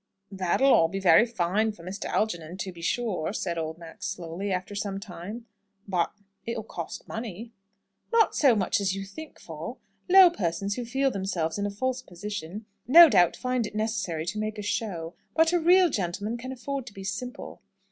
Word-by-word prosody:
"That'll 190 +1 +3
be 195 - -5
all - - -4
very 185 +6 +6
fine 215 +1 0
for 170 - -15
Mr. 190 +4 -6
Algernon, 175 -5 -2
to 190 -1 -4
be 170 -1 -12
sure," 190 -3 -1
said 170 -6 -2
old 160 0 -4
Max, 165 -1 -8
slowly, 185 +1 -4
after 185 +2 -3
some 200 -1 -3
time, 200 +4 -8 0.4
"but 180 -3 0 0.3
it'll 230 -1 -4
cost 170 -5 -7
money." 225 0 -6 0.6
"Not 460 -1 +4
so 270 -6 +5
much 205 +1 +1
as 190 -1 0
you 195 0 -5
think 310 +11 -10
for. - - -7 0.3
Low 375 -1 +9
persons 195 - -2
who 245 +2 -4
feel 270 +3 +1
themselves 190 -4 -2
in 200 - 0
a - - -2
false 255 +5 -2
position, 205 0 -7 0.2
no 330 +5 +10
doubt 175 -9 +4
find 250 -3 -1
it - - -11
necessary 215 -7 -2
to 210 +5 -3
make 215 0 -3
a 210 - -5
show. 185 -6 -3 0.2
But 325 +1 +4
a 350 - +4
real 360 +2 +6
gentleman 200 +3 -2
can 250 +2 -6
afford 265 0 -5
to 215 - -9
be 195 - -9
simple." 200 +6 -6
205 Hz, 190 wpm, -27 LUFS, 180-240 Hz, 0.6 s, no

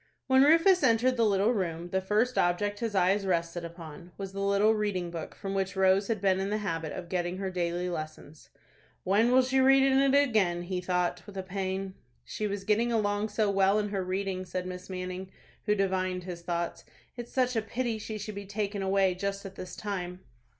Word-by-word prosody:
When 265 0 +5
Rufus 330 +6 +5
entered 255 0 +3
the 230 -2 +3
little 200 +2 +3
room, 175 -4 -3
the 190 - +1
first 215 +6 +1
object 205 +4 +1
his 225 -3 -3
eyes 190 +2 +3
rested 170 -2 -1
upon 170 0 -10
was 195 -1 -5
the 195 - -5
little 200 +2 +3
reading 200 -5 -2
book 165 -2 -6
from 195 -1 -5
which 195 0 -1
Rose 190 +1 +3
had 225 -3 -1
been 190 -1 +2
in 195 +1 -1
the 210 - 0
habit 165 -7 -3
of 180 -2 -6
getting 175 0 -2
her 190 -1 -3
daily 175 0 -1
lessons. 155 -2 -7 0.5
"When 210 +6 +3
will 260 +1 +6
she 260 +1 +1
read 270 +1 +6
in 270 0 +4
it 275 0 +4
again?" 200 -11 +2
he 180 0 -3
thought, 180 -1 -1
with 200 -1 -10
a 190 - -3
pang. 190 0 -3 0.3
"She 215 - -3
was 200 -1 -4
getting 220 +4 +2
along 210 -1 0
so 210 -1 +1
well 195 +1 +3
in 210 -1 0
her 195 -2 -2
reading," 185 0 -2
said 180 0 -4
Miss 180 0 -7
Manning, 185 0 -5 0.4
who 210 - +3
divined 185 -2 -1
his 175 -1 -7
thoughts. 170 0 -3 0.3
"It's 240 -1 -8
such 255 -1 +1
a 225 - +2
pity 230 +1 -3
she 215 0 -5
should 210 +1 -6
be 200 -1 -7
taken 205 0 -3
away 190 -1 +2
just 200 +2 -4
at 195 - -7
this 185 -1 -8
time." 185 -3 -5
195 Hz, 210 wpm, -29 LUFS, 180-215 Hz, 0.5 s, will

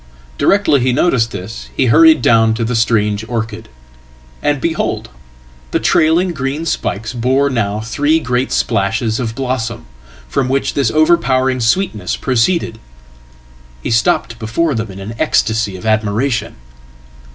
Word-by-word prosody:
Directly 195 -8 +3
he 130 +1 +1
noticed 125 -6 +2
this 100 +2 -8
he 130 - +3
hurried 160 +3 +5
down 110 -1 +4
to 115 0 -2
the 120 +1 -2
strange 105 -2 +1
orchid. 110 -2 -4 0.7
And, 145 -1 0
behold! 165 +3 -2 0.6
the - - 0
trailing 170 +3 +2
green 140 +2 -3
spikes 110 -7 -3
bore 130 +4 +1
now 105 -4 -1
three 145 +7 +1
great 125 -3 -1
splashes 110 +3 0
ofblossom, 120 -1 -3 0.4
from 125 - -1
which 135 +1 0
this 140 -5 +1
overpowering 130 -4 +2
sweetness 115 - 0
proceeded. 120 -1 0 1.0
He - - -2
stoppedbefore 115 +6 0
them 115 -1 -3
in 95 0 -9
an 100 +3 -7
ecstasy 110 -9 +1
of 95 - -9
admiration. 110 - 0
120 Hz, 130 wpm, -16 LUFS, 110-140 Hz, 1.0 s, hurried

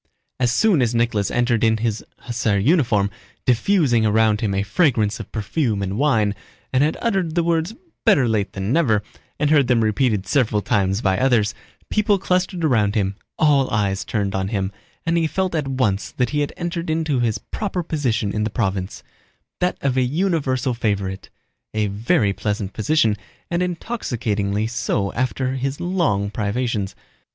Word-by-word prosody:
As 125 -2 +2
soon 190 - +3
as 120 -1 +1
Nicholas 115 -4 +1
entered 120 -2 +1
in 110 -1 +4
his 110 -1 -2 0.2
hussar 120 -4 0
uniform, 110 - +2 0.3
diffusing 125 - +3
around 110 0 +3
him 100 -4 0
a 100 - +1
fragrance 110 - +1
of 110 - -8
perfume 110 -1 -1
and 95 0 -3
wine, 115 -6 +2 0.4
and 130 +2 +4
had 155 - 0
uttered 190 -8 0
the 170 - +2
words 170 +4 0 0.3
"better 170 - +4
late 105 -3 0
than 100 +4 -2
never" 120 -11 +2 0.4
and 150 0 +2
heard 145 -4 +4
them 120 -3 +3
repeated 110 -2 +1
several 110 -7 +1
times 95 +1 +1
by 95 -4 +1
others, 115 -6 +2 0.4
people 210 -1 +3
clustered 180 -2 0
around 110 -8 +2
him; 100 -2 0 0.2
all 145 -4 +3
eyes 100 -2 0
turned 100 -3 -2
on 95 0 -1
him, 100 -2 -2 0.3
and 165 +1 +2
he 165 - +1
felt 185 +2 -1
at 155 -4 -1
once 125 -7 0
that 125 - 0
he 150 - 0
had 145 0 -1
entered 170 -1 -3
into 155 -4 0
his 115 -2 +1
proper 190 - -4
position 120 -10 -1
in 105 - 0
the 110 - 0
province—that 100 - -4
of 135 -2 0
a - - +4
universal 135 -3 0
favorite: 100 -4 -2 0.5
a 110 -1 +2
very 105 - +1
pleasant 105 -1 -3
position, 110 -2 +2 0.4
and 170 +1 +1
intoxicatingly 110 - -2
so 105 -4 -1
after 130 +1 -1
his 135 +2 -3
long 165 - 0
privations. 105 -1 -2
120 Hz, 165 wpm, -21 LUFS, 105-155 Hz, 0.5 s, in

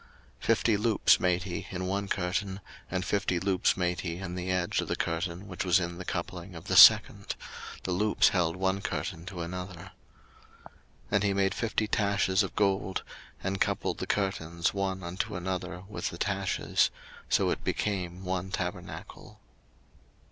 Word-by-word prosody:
02:036:012 - - -10
Fifty 110 -3 +3
loops 110 0 +4
made 90 -1 +1
he 90 -3 -5
in 90 0 -4
one 100 +2 -1
curtain, 95 +1 -1 0.3
and 95 +1 -2
fifty 100 -3 0
loops 95 0 +2
made 90 -1 0
he 85 -2 -3
in 90 -2 -5
the 90 0 -4
edge 90 -1 +1
of - - -5
the - - -1
curtain 85 +3 -2
which 95 -3 -4
was 90 -1 +4
in 85 0 -4
the 90 - -6
coupling 90 +1 -4
of 80 - -9
the - - -1
second: - - +8 0.5
the 95 - -3
loops 105 +4 +4
held 85 -3 +1
one 95 +1 0
curtain 85 -2 -4
to 90 -2 -5
another. 90 +1 -6 0.7
02:036:013 - - -15 0.4
And 100 -1 +3
he 100 -1 +2
made 95 -1 +2
fifty 110 -1 -1
taches 100 -2 +2
of 95 - -3
gold, 95 -2 +1 0.4
and 95 +1 -2
coupled - - 0
the - - -3
curtains 85 -4 0
one 95 -2 -2
unto 100 +5 -3
another 90 0 -4
with 105 - -3
the - - -8
taches: - - +1 0.4
so - - +3
it - - -3
became 95 -3 -2
one 95 0 -2
tabernacle. 90 -2 -6
95 Hz, 170 wpm, -29 LUFS, 90-100 Hz, 0.7 s, second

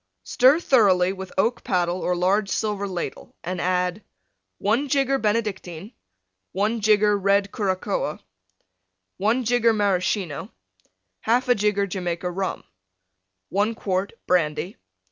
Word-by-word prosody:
Stir 265 +6 +4
thoroughly 195 - +3
with 190 -1 -8
oak 230 +5 +1
paddle 180 -1 0
or 180 - 0
large 195 +3 +1
silver 205 -2 -1
ladle, 180 -3 -6
and 180 0 -3
add: 180 +2 0 0.5
1 235 +8 0
jigger 275 -1 +2
Benedictine. 210 -3 -2 0.6
1 215 +4 0
jigger 210 0 +4
Red 200 0 +1
Curacoa. 190 -5 -2 1.0
1 225 +6 +1
jigger 235 0 +3
Maraschino. 190 -6 -1 0.8
1/2 245 +2 +3
jigger 205 -1 +1
Jamaica 180 -2 -3
Rum. 190 +1 -3 0.9
1 205 +4 0
quart 190 -1 -2
Brandy. 165 0 0
200 Hz, 110 wpm, -23 LUFS, 180-220 Hz, 1.0 s, Stir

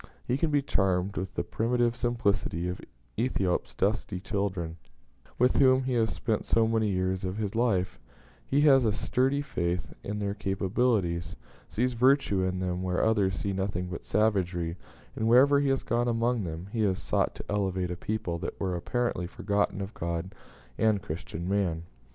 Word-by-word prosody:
He 125 - +1
can 155 +4 0
be 145 -2 +2
charmed 95 -4 +1
with 95 +1 -4
the - - 0
primitive 120 +1 0
simplicity 105 -8 0
of 90 - -4 0.4
Ethiop's 100 -7 0
dusky 100 -2 0
children, 95 -5 -3 0.6
with 125 +1 +3
whom 130 -1 +5
he 130 0 -1
has 115 -2 +2
spent 110 -3 -2
so 115 -1 +3
many 110 -1 +1
years 95 0 -1
of 95 +1 -3
his 105 -2 -2
life; 110 -6 +1 0.4
he 140 +2 +1
has 135 -3 +6
a 110 - +3
sturdy 135 +6 0
faith 90 - -2
in 105 +1 -3
their 100 -1 -1
capabilities; 95 -4 0 0.3
sees 125 +3 0
virtue 125 -5 +3
in 95 0 0
them 90 -1 -2
where 90 -1 0
others 105 -4 +2
see 100 - -2
nothing 95 -2 -2
but 85 - -6
savagery; 90 -6 0 0.4
and 110 - -1
wherever 135 +4 +6
he 140 -1 +1
has 135 0 +1
gone 120 +1 0
among 115 -2 +1
them, 85 +3 -6
he 115 - -3
has 95 -3 +2
sought - - 0
to - - -8
elevate 95 -3 -1
a - - -2
people 95 -3 -3
that 85 - -5
were 95 -2 -1
apparently 110 -1 -1
forgotten 100 +1 -1
of 100 +2 -5
God 85 +3 -3 0.5
and 110 -3 +2
Christian 85 -1 -5
man. 95 -5 0
100 Hz, 175 wpm, -28 LUFS, 90-120 Hz, 0.6 s, has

